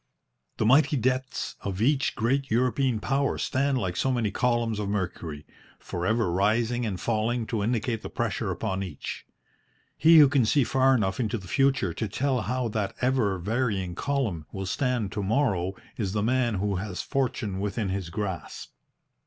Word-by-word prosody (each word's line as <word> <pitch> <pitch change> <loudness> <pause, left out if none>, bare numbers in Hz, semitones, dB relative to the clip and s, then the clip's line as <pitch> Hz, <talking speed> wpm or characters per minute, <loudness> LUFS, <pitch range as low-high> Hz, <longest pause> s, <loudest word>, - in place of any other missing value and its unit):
The - - +1
mighty 140 +5 +5
debts 130 +1 -1
of 95 -2 -4
each 135 +5 +2
great 135 +4 0
European 125 +1 +1
Power 135 +6 0
stand 135 0 0
like 95 -6 -2
so 130 +8 +1
many 115 -5 0
columns 120 -3 0
of 100 -1 -2
mercury, 90 -7 -3 0.3
for 90 0 -4
ever 110 -4 +1
rising 115 +6 +1
and 95 -4 -3
falling 115 +1 0
to 110 -2 -2
indicate 115 +1 -1
the - - -6
pressure - - -2
upon 95 0 -2
each. 95 -2 -6 0.7
He 160 +2 +7
who 150 -2 +9
can 135 -2 +3
see 135 +5 +3
far 130 +2 +3
enough 95 -5 0
into 115 -1 0
the 95 -4 -10
future 135 -7 +2
to 110 - -3
tell 130 +4 0
how 125 +4 -1
that 105 -2 -2
ever 125 -7 +1
varying 100 -2 -1
column 110 - -2
will 95 0 -4
stand 120 0 -1
to 105 - -3
morrow 100 -4 +1 0.2
is 100 -4 -2
the 105 -1 0
man 120 -1 +1
who 100 0 -1
has 95 -1 -4
fortune 120 -7 -1
within 100 +1 -2
his 95 -2 -3
grasp. 95 -3 -5
110 Hz, 170 wpm, -27 LUFS, 100-130 Hz, 0.7 s, who